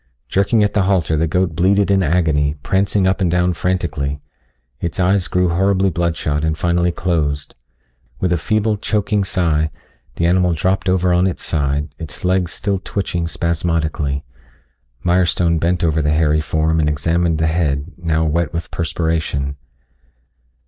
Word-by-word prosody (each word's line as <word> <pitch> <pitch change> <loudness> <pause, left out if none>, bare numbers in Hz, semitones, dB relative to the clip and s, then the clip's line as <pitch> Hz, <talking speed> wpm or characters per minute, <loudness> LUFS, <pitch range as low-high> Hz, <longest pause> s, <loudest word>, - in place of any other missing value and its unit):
Jerking 100 +3 +2
at 105 - 0
the 105 - +2
halter 85 -5 +1
the 80 +2 +1
goat 90 0 0
bleated 100 +4 +2
in 95 -1 +3
agony, 75 -4 +1
prancing 95 0 +1
up 95 +1 +1
and 90 - +2
down 90 +1 +2
frantically. 80 -6 -2 0.6
Its 85 +1 -4
eyes 95 0 +2
grew 90 -1 +1
horribly 95 +2 +2
bloodshot 80 -3 -1
and 80 0 0
finally 85 +1 +1
closed. 75 -5 -1 0.7
With 90 - 0
a - - +2
feeble, 110 +3 0
choking 105 0 0
sigh, 80 -5 0 0.5
the 85 - 0
animal 90 0 +3
dropped 95 +4 0
over 90 -1 +2
on 90 +2 +3
its 90 - -3
side, 75 -1 -1
its 80 +2 -7
legs 90 -1 +1
still 100 -1 -2
twitching 90 -4 -2
spasmodically. 80 -4 -1 0.8
Mirestone 85 -1 +2
bent 85 +2 0
over 80 -1 +2
the 75 - 0
hairy 75 0 +2
form 80 +1 0
and 75 -1 +2
examined 80 +3 0
the 80 - +1
head, 80 -1 0
now 80 -2 0
wet 80 0 0
with 85 0 -5
perspiration. 80 -4 -2
85 Hz, 155 wpm, -18 LUFS, 80-95 Hz, 0.8 s, in